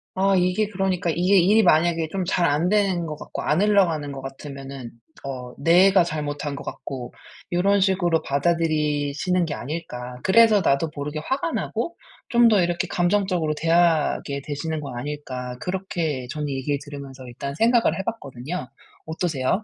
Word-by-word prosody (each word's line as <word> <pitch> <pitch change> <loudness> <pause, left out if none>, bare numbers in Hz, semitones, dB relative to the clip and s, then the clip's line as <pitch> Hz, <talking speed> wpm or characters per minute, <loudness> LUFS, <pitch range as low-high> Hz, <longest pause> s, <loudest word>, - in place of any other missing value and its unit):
아 195 +1 +3
이게 185 +3 +2
그러니까 190 -3 -1
'이게 180 +4 +3
일이 205 +5 +5
만약에 165 -2 +3
좀 190 -2 -2
잘 175 -1 +2
안 150 +4 +1
되는 195 -4 +1
것 155 -1 -5
같고 - - -6
안 155 +5 +2
흘러가는 180 -8 +2
것 135 -1 -7
같으면은 135 -2 -8 0.3
어 125 -2 -6
내가 180 +5 +5
잘못한 145 -3 -4
것 - - -7
같고 125 -3 -7 0.4
요런 200 +3 +3
식으로 180 -4 +2
받아들이시는 155 +2 0
게 155 - -4
아닐까. 125 -4 -6
그래서 220 +2 +6
나도 155 -1 +1
모르게 145 +1 -4
화가 275 - -2
나고 340 - -3 0.3
좀 235 -1 +5
더 210 -4 +4
이렇게 175 0 0
감정적으로 180 -3 +1
대하게 165 -4 +1
되시는 155 +2 -3
거 140 -3 -7
아닐까.' 130 -2 -5
그렇게 170 -8 -3
저는 150 +1 -3
얘기를 140 +1 -1
들으면서 140 -2 -9
일단 140 +3 -6
생각을 230 - +3
해 195 - -3
봤거든요. 150 - -5 0.4
어떠세요? 160 +2 -1
165 Hz, 350 characters per minute, -23 LUFS, 140-185 Hz, 0.4 s, 그래서